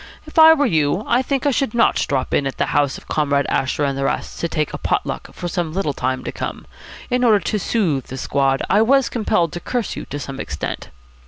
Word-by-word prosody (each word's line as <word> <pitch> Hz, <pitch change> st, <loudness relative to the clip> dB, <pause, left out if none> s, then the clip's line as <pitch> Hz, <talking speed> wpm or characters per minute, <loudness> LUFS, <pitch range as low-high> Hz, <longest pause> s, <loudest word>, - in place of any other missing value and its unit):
If 310 Hz, +1 st, -1 dB
I 320 Hz, 0 st, +9 dB
were 290 Hz, -1 st, +2 dB
you, 160 Hz, -, +1 dB
I 245 Hz, -, +2 dB
think 275 Hz, +1 st, -2 dB
I 285 Hz, -, +4 dB
should 265 Hz, -3 st, -1 dB
not 235 Hz, -, +3 dB
drop 135 Hz, -2 st, -1 dB
in 140 Hz, -, +2 dB
at 135 Hz, -, -5 dB
the -, -, +1 dB
house 145 Hz, -2 st, +1 dB
of -, -, -15 dB
Comrade 140 Hz, -2 st, +1 dB
Asher 135 Hz, +2 st, 0 dB
and 140 Hz, -1 st, 0 dB
the 135 Hz, -, -2 dB
rest -, -, -3 dB
to 170 Hz, -, -1 dB
take 155 Hz, -2 st, -1 dB
pot -, -, 0 dB
luck -, -, -5 dB
for 175 Hz, -, -6 dB
some 175 Hz, -3 st, -2 dB
little 170 Hz, -6 st, -1 dB
time 130 Hz, 0 st, -2 dB
to -, -, -4 dB
come. -, -, -6 dB, 0.5 s
In 250 Hz, 0 st, +1 dB
order 220 Hz, -4 st, +5 dB
to 210 Hz, +2 st, -2 dB
soothe 175 Hz, -, 0 dB
the 130 Hz, -, -7 dB
squad 135 Hz, 0 st, 0 dB
I 205 Hz, -, +4 dB
was 265 Hz, +3 st, +3 dB
compelled 175 Hz, -8 st, 0 dB
to 175 Hz, -, -4 dB
curse 240 Hz, +3 st, -3 dB
you -, -, -6 dB
to 145 Hz, -, -6 dB
some 135 Hz, -2 st, -6 dB
extent." 75 Hz, -, -5 dB
170 Hz, 240 wpm, -20 LUFS, -, 0.5 s, I